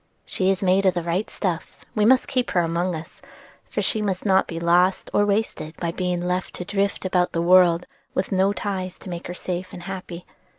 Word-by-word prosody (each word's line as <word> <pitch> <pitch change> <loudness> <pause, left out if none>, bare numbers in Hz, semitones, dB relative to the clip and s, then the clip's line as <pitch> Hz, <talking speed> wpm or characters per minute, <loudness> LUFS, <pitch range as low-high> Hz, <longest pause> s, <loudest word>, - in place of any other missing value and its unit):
"She 185 0 0
is 195 0 +1
made 190 +1 +3
of 185 - +3
the 175 - -1
right 175 +5 -1
stuff, 175 -5 -3
and - - -24
we 210 - +3
must 260 +3 +5
keep 255 -2 0
her 175 - +2
among 170 +2 0
us; 160 +1 -10 0.5
for - - -1
she 220 - +1
must 195 -2 -2
not 190 -1 +4
be 165 - -5
lost 175 +2 +2
or 205 - +3
wasted 200 -6 -1
by 170 -1 -2
being 180 0 -2
left 180 +1 -2
to 180 - -5
drift 200 0 -1
about 180 -1 +1
the 165 - 0
world 180 -1 +5 0.3
with 185 - -1
no 190 +1 +3
ties 190 -3 -3
to 185 - -9
make 170 0 -5
her 175 - -6
safe 180 0 -4
and 175 - -8
happy. 180 -2 -7
185 Hz, 220 wpm, -23 LUFS, 175-195 Hz, 0.5 s, must